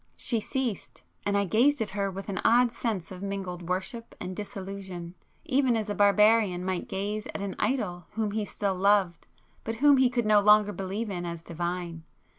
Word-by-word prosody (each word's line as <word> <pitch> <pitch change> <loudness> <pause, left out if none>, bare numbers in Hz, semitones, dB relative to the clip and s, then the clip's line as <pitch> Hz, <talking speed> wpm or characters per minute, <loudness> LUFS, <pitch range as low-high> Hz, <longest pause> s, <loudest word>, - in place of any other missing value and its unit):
She 230 - 0
ceased,—and 215 -4 -4
I 200 - +2
gazed 250 +9 +3
at 220 - -1
her 200 0 -1
with 195 +1 -7
an 195 -3 -3
odd 240 +1 +5
sense 205 -9 -3
of 185 0 -8
mingled 185 -3 -5
worship 210 +6 -3
and 185 0 -5
disillusion, 190 -3 -6 0.3
even 260 -3 +2
as 215 -1 -2
a - - 0
barbarian 205 -2 +4
might 185 -2 -2
gaze 205 +2 -3
at - - -6
an 200 -1 -4
idol 185 -10 -1
whom 215 -1 -1
he 215 +1 -1
still 200 -1 -2
loved, 190 -2 +2 0.4
but 225 - -3
whom 285 +3 +5
he 260 -1 +4
could 240 -2 -1
no 215 -1 +5
longer 210 0 +5
believe 200 +3 -4
in 175 -2 -4
as 170 -1 -5
divine. 170 0 -4
200 Hz, 185 wpm, -28 LUFS, 185-220 Hz, 0.4 s, odd